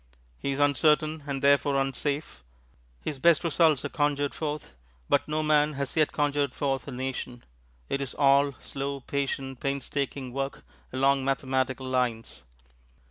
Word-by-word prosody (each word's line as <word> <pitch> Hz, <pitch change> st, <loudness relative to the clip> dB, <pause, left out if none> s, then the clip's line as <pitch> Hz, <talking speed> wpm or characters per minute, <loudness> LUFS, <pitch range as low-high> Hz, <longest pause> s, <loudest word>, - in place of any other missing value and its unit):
He -, -, -3 dB
is 135 Hz, -, -2 dB
uncertain 150 Hz, +1 st, +2 dB
and 140 Hz, -1 st, -3 dB
therefore 140 Hz, 0 st, +4 dB
unsafe. 135 Hz, -, -2 dB, 0.6 s
His 145 Hz, -3 st, -4 dB
best 170 Hz, +2 st, +5 dB
results 160 Hz, -4 st, +3 dB
are -, -, -2 dB
conjured 145 Hz, -1 st, 0 dB
forth, 150 Hz, -, -4 dB, 0.3 s
but -, -, +2 dB
no 155 Hz, +1 st, -1 dB
man 150 Hz, 0 st, +3 dB
has 140 Hz, -1 st, -3 dB
yet 155 Hz, -2 st, +3 dB
conjured 145 Hz, -2 st, 0 dB
forth 135 Hz, -2 st, -1 dB
a -, -, -5 dB
Nation 125 Hz, -1 st, -5 dB, 0.4 s
it 140 Hz, -, -1 dB
is 135 Hz, -, -5 dB
all 140 Hz, 0 st, +4 dB
slow, 140 Hz, 0 st, -5 dB
patient, 135 Hz, -1 st, -3 dB
painstaking 140 Hz, -1 st, -3 dB
work 135 Hz, +1 st, -4 dB, 0.3 s
along 135 Hz, +1 st, +2 dB
mathematical 130 Hz, -1 st, -1 dB
lines. 125 Hz, -, -1 dB
140 Hz, 140 wpm, -27 LUFS, 135-145 Hz, 0.6 s, best